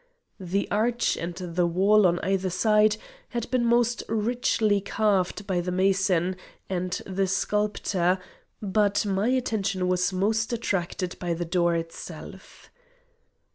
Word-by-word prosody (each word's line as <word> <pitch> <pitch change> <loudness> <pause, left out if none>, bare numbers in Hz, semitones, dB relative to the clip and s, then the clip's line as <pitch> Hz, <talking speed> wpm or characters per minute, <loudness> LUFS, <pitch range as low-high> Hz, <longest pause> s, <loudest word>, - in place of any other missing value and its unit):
The 190 +2 -1
arch 235 +3 +1
and 170 +1 -5
the 175 -1 -1
wall 195 +4 +4
on 175 0 +1
either 190 +1 0
side 210 +3 +3 0.3
had 235 0 -4
been 255 -2 +2
most 235 -1 +2
richly 220 -2 +1
carved 200 -1 0
by 185 -3 0
the 180 +1 -3
mason 185 -1 +1 0.3
and 180 -1 -2
the 195 0 -1
sculptor, 195 -2 0 0.5
but 205 +1 +1
my 200 +2 0
attention 215 -7 0
was 180 +1 +1
most 220 +5 0
attracted 185 -5 -2
by 175 -2 -1
the 175 +1 -3
door 175 0 +1
itself. 165 0 -8
195 Hz, 130 wpm, -26 LUFS, 180-215 Hz, 0.5 s, wall